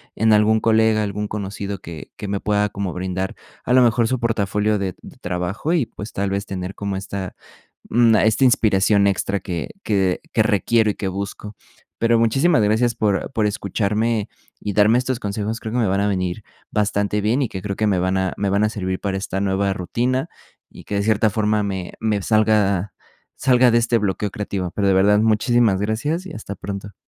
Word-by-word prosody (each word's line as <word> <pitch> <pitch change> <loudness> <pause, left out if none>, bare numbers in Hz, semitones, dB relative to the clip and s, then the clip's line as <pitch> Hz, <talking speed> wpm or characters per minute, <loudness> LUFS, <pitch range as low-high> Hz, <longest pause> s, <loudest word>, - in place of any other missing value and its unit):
en 110 0 +3
algún 110 +1 +4
colega, 110 -1 +3
algún 105 0 -3
conocido 100 -1 -5
que 80 -3 -9
que 105 - -6
me 100 0 -2
pueda 105 0 +1
como 100 -2 -4
brindar 95 +1 -3 0.3
a 125 - +1
lo 130 - +6
mejor 115 0 +3
su 130 0 -1
portafolio 105 -2 0
de 95 -2 -3
de - - -13
trabajo 90 - -2
y, 155 -9 +2
pues, 105 +1 -9
tal 100 0 -1
vez 100 +1 -2
tener 95 0 -5
como 100 -1 -4
esta, 95 0 -5 0.5
mm, 115 -1 +4
esta 110 +5 +3
inspiración 100 -3 +3
extra 100 +1 0
que 85 -4 -4
que 95 -4 +1
que 110 - +2
requiero 110 +1 +2
y 105 - -1
que 95 - -4
busco. 100 +2 -5 0.4
Pero 115 0 +3
muchísimas 130 +4 +3
gracias 110 +3 +2
por 105 -1 0
por 110 -5 0
escucharme 105 +2 -1 0.3
y 105 - -4
darme 105 +4 +4
estos 130 -1 -1
consejos, 105 +2 -3
creo 110 - -5
que 125 - 0
me 110 - +2
van 95 +1 +1
a 100 - +1
venir 90 +1 -2 0.3
bastante 105 0 0
bien 115 +7 +1
y 130 - +1
que 95 - -6
creo 100 0 -4
que 110 - +1
me 95 -3 +2
van 95 +1 0
a 95 -1 -1
me 100 -1 0
van 100 +2 +2
a - - +1
servir 95 -3 -3
para 100 -1 -2
esta 95 0 -3
nueva 100 0 0
rutina 125 - -1 0.4
y - - -13
que 100 - -5
de 100 - +1
cierta 110 0 +2
forma 105 0 0
me 95 -3 -4
me 105 -3 0
salga 105 -3 +2 0.4
salga 125 -2 +4
de 115 - +4
este 115 0 +2
bloqueo 100 0 -2
creativo, 100 -4 -4
pero 100 -1 0
de - - +4
verdad, 100 +2 +4
muchísimas 110 -1 +2
gracias 135 - -2
y 190 - -8
hasta 105 -2 -7
pronto. 100 0 -7
105 Hz, 200 wpm, -21 LUFS, 100-110 Hz, 0.5 s, lo